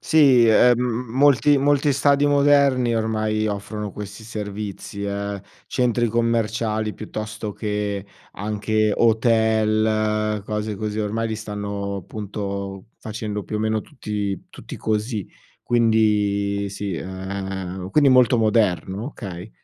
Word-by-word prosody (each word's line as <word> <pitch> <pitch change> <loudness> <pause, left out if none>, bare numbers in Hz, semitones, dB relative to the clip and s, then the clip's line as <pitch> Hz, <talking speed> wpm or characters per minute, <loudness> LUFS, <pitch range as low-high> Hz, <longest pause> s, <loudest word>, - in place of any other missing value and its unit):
Sì, 135 -7 +5
ehm, 120 +2 +5
m 125 -1 -2
molti 145 +1 +5
molti 145 +1 +3
stadi 140 +1 +3
moderni 140 -4 +4
ormai 110 -1 0
offrono 105 +1 -4
questi 105 +1 -8
servizi, 105 -1 -6
eh, 100 0 -3 0.3
centri 120 -2 +1
commerciali 110 -1 0
piuttosto 110 0 -6
che 105 -2 -3 0.3
anche 110 +1 0
hotel, 110 -2 +2
cose 105 0 -3
così, 105 +1 -3
ormai 110 +2 -1
li 110 - -2
stanno, 100 -2 -4
punto, 100 -1 -5
facendo 105 -1 -5
più 105 - -4
o - - -2
meno 110 0 0
tutti 105 -8 -4
tutti - - -9
così. 110 -1 -2 0.4
Quindi 105 -3 +2
sì, 100 -1 -4
ehm, 95 0 -5
quindi 145 +2 +5
molto 125 -1 +5
moderno? 105 -2 +1
Okay. 100 -8 -8
110 Hz, 115 wpm, -22 LUFS, 100-115 Hz, 0.4 s, Sì